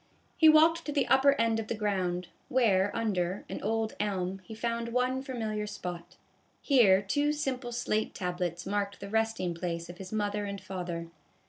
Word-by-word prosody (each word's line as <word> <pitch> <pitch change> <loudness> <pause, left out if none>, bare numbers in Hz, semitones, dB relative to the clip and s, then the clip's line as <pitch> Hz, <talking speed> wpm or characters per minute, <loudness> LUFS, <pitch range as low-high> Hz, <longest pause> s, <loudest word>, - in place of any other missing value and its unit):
He 320 -2 +7
walked 325 +2 +6
to 295 - -3
the 280 -3 +1
upper 270 +1 +6
end 230 -4 +1
of 220 - -4
the - - -2
ground, 185 -4 -1 0.2
where 205 -6 +3
under, 195 -5 -1
an - - -6
old 220 +1 -1
elm, 195 -2 -1
he 220 +5 -9
found 235 +1 -2
one 250 +2 0
familiar 220 -6 -3
spot. 175 -3 -7 0.4
Here 205 -9 +5
two 290 +9 +1
simple 265 -4 -3
slate 225 -2 -1
tablets 175 -2 -3
marked 200 0 -2
the 200 - -7
resting 220 -5 0
place 170 0 -4
of 175 - -15
his 190 -1 -8
mother 205 -1 -1
and 200 0 -5
father. 175 -3 -5
210 Hz, 170 wpm, -30 LUFS, 185-240 Hz, 0.4 s, He